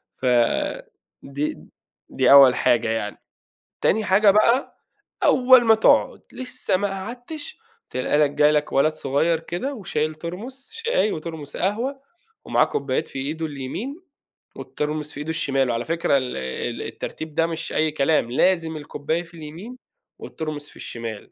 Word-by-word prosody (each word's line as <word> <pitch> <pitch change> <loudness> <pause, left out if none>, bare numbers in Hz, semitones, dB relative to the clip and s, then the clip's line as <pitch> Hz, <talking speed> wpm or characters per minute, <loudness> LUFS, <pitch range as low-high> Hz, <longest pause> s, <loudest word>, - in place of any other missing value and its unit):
ف - - -7 1.0
دي 140 +2 -3 0.5
دي - - +2
أول 135 -3 +9
حاجة 120 -2 +2
يعني. 110 -2 -2 0.6
تاني 215 +1 +2
حاجة 200 +2 +5
بقى، 230 +6 +2 0.5
أول 255 -4 +6
ما 225 -1 +6
تقعد، 220 - +3
لسه 255 -6 -2
ما 205 +2 -1
قعدتش، 245 - -7 0.3
تلاقي 130 +3 0
لك 150 -2 +4
جالك 150 +1 +2
ولد 155 +3 +3
صغير 155 +4 0
كده 175 +13 -4
وشايل 155 -8 -2
Thermos 215 - -8
شاي 455 - 0
وThermos 160 -3 -7
قهوة 235 +9 -1 0.4
ومعاه - - +3
كوبايات 135 -2 -2
في - - -7
إيده 155 +4 -3
اليمين 150 - -5 0.6
والThermos 150 0 -3
في - - -9
إيده 150 +2 -4
الشمال. 135 -5 0
على 120 0 -1
فكرة 165 -3 +1
ال 130 -1 -4
ال 65 0 -4
الترتيب 160 -1 -7
ده 165 - +2
مش 165 -1 -5
أي 155 0 +1
كلام، 145 -4 +1
لازم 165 +3 +2
الكوباية 150 +2 -3
في 170 0 -16
اليمين 165 +10 -9 0.5
والThermos 155 -2 -5
في - - -18
الشمال. 115 -3 -6
160 Hz, 145 wpm, -23 LUFS, 145-210 Hz, 1.0 s, أول